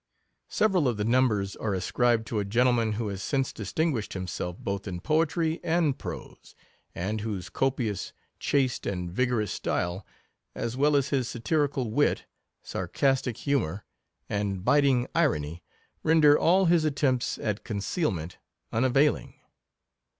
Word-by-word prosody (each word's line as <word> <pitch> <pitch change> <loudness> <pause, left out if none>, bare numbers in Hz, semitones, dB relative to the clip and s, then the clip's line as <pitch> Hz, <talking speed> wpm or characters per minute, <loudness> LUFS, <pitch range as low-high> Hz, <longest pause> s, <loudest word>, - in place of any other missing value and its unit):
Several 190 -9 +2
of 120 -4 0
the 105 - -1
numbers 110 -5 +2
are 105 -3 -1
ascribed 115 +5 +1
to 110 -2 -2
a - - 0
gentleman 115 +1 +2
who 110 0 -2
has 100 -1 -5
since 135 +2 -1
distinguished 115 - -2
him 95 -1 -3
self 90 0 -4
both 100 +1 -4
in 90 -2 -4
poetry 160 - +1
and 160 -4 +2
prose, - - -9 0.4
and 105 +5 -2
whose 105 -5 -4
co 135 - +2
pious, 115 -7 -3 0.3
chaste, 130 -3 0
and 90 -3 -3
vigorous 115 -2 0
style, 90 +3 -2 0.5
as 115 +1 -3
well 145 +2 +3
as 140 0 +2
his 130 -4 0
satirical 135 -1 -1
wit, 145 +6 +1 0.4
sarcastic 135 -4 0
humour, 110 - -1 0.4
and 100 -2 -2
bit 140 +2 +4
ing 130 -2 +2
irony, 85 - 0 0.4
render 155 -2 +6
all 185 +5 +4
his 170 -2 +4
attempts 140 -4 0
at 105 -2 -3
conceal 110 - -1
ment 85 -2 -6 0.3
unavailing. 130 +5 +2
120 Hz, 145 wpm, -27 LUFS, 100-145 Hz, 0.5 s, render